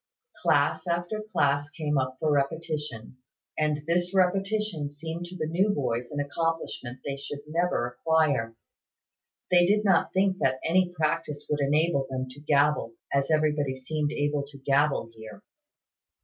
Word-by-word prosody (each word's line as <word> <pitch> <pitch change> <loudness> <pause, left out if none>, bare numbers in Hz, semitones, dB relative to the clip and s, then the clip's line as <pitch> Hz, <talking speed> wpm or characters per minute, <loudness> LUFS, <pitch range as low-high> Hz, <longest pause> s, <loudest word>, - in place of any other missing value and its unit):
Class - - +2
after 175 +5 -1
class 145 -9 +1
came 150 -3 -1
up 130 0 -2
for 155 - +1
repetition; 145 -4 -2 0.4
and 150 -1 0
this 175 +3 0
repetition 195 -3 +1
seemed 160 +4 -6
to 180 +2 -9
the 155 - -1
new 180 +6 +1
boys 125 - -1
an 145 - -4
accomplishment 145 -4 -3
they 140 -1 -3
should 145 +1 -6
never 165 -4 0
acquire. 135 -3 +1 1.0
They 175 -1 +6
did 210 +2 +2
not 195 - +3
think 190 0 +1
that 130 0 +1
any 180 +2 +3
practice 155 -3 -2
would 150 - +1
enable 145 0 +2
them 130 -1 -3
to 135 - -12
gabble, 145 -5 +2 0.2
as 140 0 +1
everybody 150 -3 +1
seemed 150 +3 -2
able 145 0 0
to 140 -1 -13
gabble 140 -3 +1
here. 110 - -11
150 Hz, 150 wpm, -27 LUFS, 140-170 Hz, 1.0 s, They